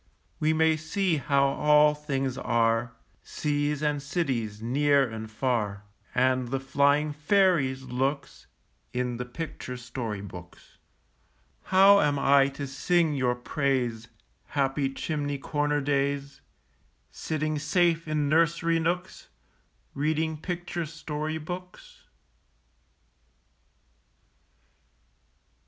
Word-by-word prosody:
We 155 +1 +2
may 160 0 +3
see 165 +2 0
how 140 0 +2
all 150 +2 +4
things 135 -3 -3
are, 115 -2 +1 0.3
Seas 145 0 -2
and 150 -1 0
cities, 130 - -2
near 140 +4 +2
and 110 -1 -7
far, 110 -4 -1 0.3
And 130 0 +2
the 135 +2 -2
flying 140 +2 +2
fairies' 150 -5 +2
looks, 135 +3 -3 0.5
In 125 -1 -2
the 125 - -4
picture 125 -1 -6
story 115 -4 -5
books. 90 -3 -12 0.9
How 195 +2 +6
am 145 -1 +2
I 140 0 +5
to 140 +1 -5
sing 155 +4 +1
your 125 -3 +1
praise, 125 -3 -1 0.4
Happy 135 -1 0
chimney 145 0 -3
corner 145 +1 -1
days, 140 0 -1 0.7
Sitting 155 -1 -2
safe 165 +2 +1
in 150 -1 0
nursery 165 +2 +2
nooks, 175 +3 -3 0.7
Reading 155 +2 0
picture 175 0 -4
story 155 0 -4
books? 180 - -9
145 Hz, 100 wpm, -27 LUFS, 130-155 Hz, 0.9 s, How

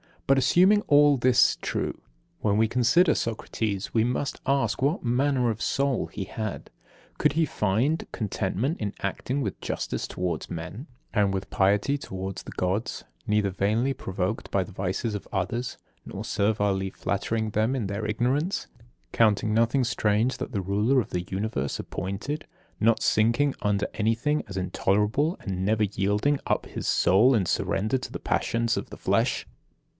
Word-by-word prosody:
But, 135 - +4
assuming 185 +10 +5
all 145 -1 +5
this 125 0 +4
true, - - -3 0.4
when 105 -1 +1
we 110 0 +3
consider 130 +8 +4
Socrates, 110 -3 -3
we 115 -1 +3
must 125 +3 -2
ask 135 -1 +1
what 145 +7 +1
manner 125 0 +2
of 110 0 -6
soul 135 +1 0
he 100 - -5
had. 110 +2 -5 0.5
Could - - +2
he 160 +1 +2
find 125 +6 0
contentment 110 - -2
in 105 -2 -3
acting 125 +8 -2
with - - -3
justice - - -3
towards 90 -1 -3
men, 90 - -6 0.3
and 100 -3 +2
with 95 0 -3
piety 100 +8 +2
towards 95 -6 -6
the - - -9
Gods, 95 +5 -2 0.2
neither 105 -1 +2
vainly 110 +8 +1
provoked 95 -4 -3
by 100 - +1
the 95 - -12
vices 95 +4 -2
of 100 - -6
others, 110 +6 -2 0.3
nor - - -6
servilely 100 -2 0
flattering 110 +3 -2
them 110 +5 +1
in 115 -7 -2
their 100 +2 -3
ignorance; 130 - 0 0.4
counting 110 -1 +3
nothing 115 +4 +3
strange 115 +1 +1
that - - -5
the 100 - 0
Ruler 105 +8 +2
of 105 - -8
the 90 -1 -2
Universe 95 -9 -2
appointed, 100 - -4 0.3
not 115 0 +3
sinking 120 +6 +3
under 105 -1 +1
anything 115 +8 +1
as 100 - -8
intolerable, 105 - +1
and 95 -1 -3
never 110 +1 +2
yielding 105 +8 +1
up - - 0
his - - -5
soul 115 +8 +4
in 100 -5 +2
surrender 110 +7 0
to - - -7
the - - -5
passions 115 0 0
of - - -4
the - - -9
flesh. - - +1
110 Hz, 160 wpm, -26 LUFS, 100-130 Hz, 0.5 s, assuming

